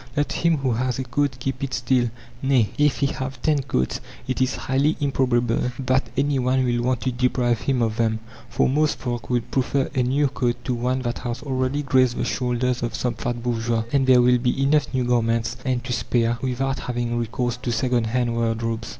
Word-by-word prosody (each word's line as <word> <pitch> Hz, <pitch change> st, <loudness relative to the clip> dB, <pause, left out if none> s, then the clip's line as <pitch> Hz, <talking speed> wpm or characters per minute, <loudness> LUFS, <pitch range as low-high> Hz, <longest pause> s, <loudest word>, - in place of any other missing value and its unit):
Let 145 Hz, -, +1 dB
him 170 Hz, -2 st, +2 dB
who 135 Hz, -2 st, 0 dB
has 125 Hz, +1 st, -1 dB
a 130 Hz, -, -2 dB
coat 130 Hz, +1 st, -1 dB
keep 135 Hz, +2 st, -3 dB
it 135 Hz, -, -2 dB
still 125 Hz, -1 st, +1 dB, 0.3 s
nay, 130 Hz, -5 st, +2 dB
if 150 Hz, -1 st, +2 dB
he -, -, +4 dB
have 130 Hz, -1 st, -4 dB
ten 150 Hz, -2 st, +2 dB
coats 95 Hz, -, -1 dB, 0.3 s
it 130 Hz, 0 st, -1 dB
is 130 Hz, 0 st, +1 dB
highly 140 Hz, +4 st, +1 dB
improbable 125 Hz, -4 st, +1 dB
that 130 Hz, 0 st, 0 dB
any 140 Hz, 0 st, +2 dB
one 130 Hz, +1 st, +2 dB
will 120 Hz, -1 st, +1 dB
want 125 Hz, -1 st, 0 dB
to 130 Hz, -, 0 dB
deprive 120 Hz, -1 st, +1 dB
him 130 Hz, -3 st, +1 dB
of 110 Hz, -1 st, -1 dB
them, 110 Hz, -1 st, +1 dB, 0.3 s
for -, -, +2 dB
most 150 Hz, +3 st, +1 dB
folk 120 Hz, -3 st, -4 dB
would 120 Hz, -2 st, -1 dB
prefer 135 Hz, +1 st, 0 dB
a 130 Hz, -, +1 dB
new 135 Hz, +4 st, +2 dB
coat 125 Hz, -3 st, -1 dB
to 125 Hz, -, -1 dB
one 125 Hz, +2 st, -1 dB
that 120 Hz, 0 st, -2 dB
has 120 Hz, +2 st, -4 dB
already 135 Hz, +1 st, -1 dB
graced 130 Hz, -3 st, +3 dB
the -, -, -1 dB
shoulders 125 Hz, 0 st, 0 dB
of 120 Hz, 0 st, -2 dB
some 125 Hz, -, -1 dB
fat 120 Hz, -1 st, -4 dB
bourgeois; 115 Hz, -1 st, 0 dB
and 135 Hz, -2 st, +3 dB
there 125 Hz, -1 st, +6 dB
will 125 Hz, 0 st, +4 dB
be 125 Hz, +2 st, 0 dB
enough 145 Hz, 0 st, +2 dB
new 130 Hz, -1 st, 0 dB
garments, 115 Hz, -1 st, +1 dB
and 125 Hz, -2 st, -1 dB
to 125 Hz, -1 st, -3 dB
spare, 115 Hz, +1 st, 0 dB
without 130 Hz, +1 st, -1 dB
having 120 Hz, -1 st, -2 dB
recourse 120 Hz, +1 st, -1 dB
to 125 Hz, -1 st, -3 dB
second 120 Hz, 0 st, +1 dB
hand 120 Hz, +1 st, 0 dB
wardrobes. 115 Hz, 0 st, -1 dB
125 Hz, 210 wpm, -23 LUFS, 120-135 Hz, 0.3 s, there